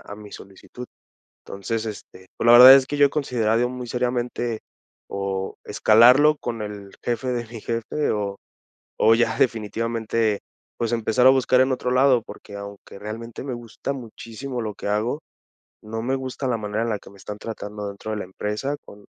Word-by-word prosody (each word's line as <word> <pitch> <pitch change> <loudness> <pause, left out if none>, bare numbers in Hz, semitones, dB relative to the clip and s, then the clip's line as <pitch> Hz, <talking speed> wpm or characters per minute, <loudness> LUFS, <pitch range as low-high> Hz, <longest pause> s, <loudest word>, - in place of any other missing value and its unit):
a 100 - -10
mi 105 -1 -12
solicitud. 100 +5 -11 0.6
Entonces, 110 +3 -4
este 95 -3 -9
Pues - - -2
la 120 - +8
verdad 125 +2 +11
es 135 -1 +4
que 145 - -3
yo 145 0 +6
he - - -3
considerado, 120 -5 +1
muy 125 -1 -6
seriamente, 120 -1 -2 0.5
o, 95 -1 -3
escalarlo 125 +8 +5
con 115 -4 -4
el 100 -2 -8
jefe 120 +2 -2
de 120 -2 -2
mi 115 -2 -9
jefe, 115 +7 -2
o 100 -2 -2 0.7
o 115 - +6
ya 120 - +1
definitivamente, 115 -1 0 0.4
pues 115 -1 -1
empezar 115 +1 +1
a - - +10
buscar 130 -1 +3
en 130 - +2
otro 125 -1 -1
lado. 130 -1 +4
Porque 100 - -11
aunque 100 -1 -10
realmente 115 +3 -7
me 135 - -4
gusta 120 +3 -5
muchísimo 125 +1 -7
lo 105 -2 -4
que - - -6
hago, 110 +8 -1 0.6
no 115 +1 -5
me 130 +3 0
gusta 130 +1 -5
la 120 - +1
manera 105 +1 -2
en - - -2
la 105 - -1
que - - -15
me 100 - -17
están 105 +2 -8
tratando 105 -2 -6
dentro 100 +2 -6
de 105 - -3
la - - -4
empresa. 105 +9 -3
Con 100 0 -14
115 Hz, 185 wpm, -23 LUFS, 105-125 Hz, 0.7 s, verdad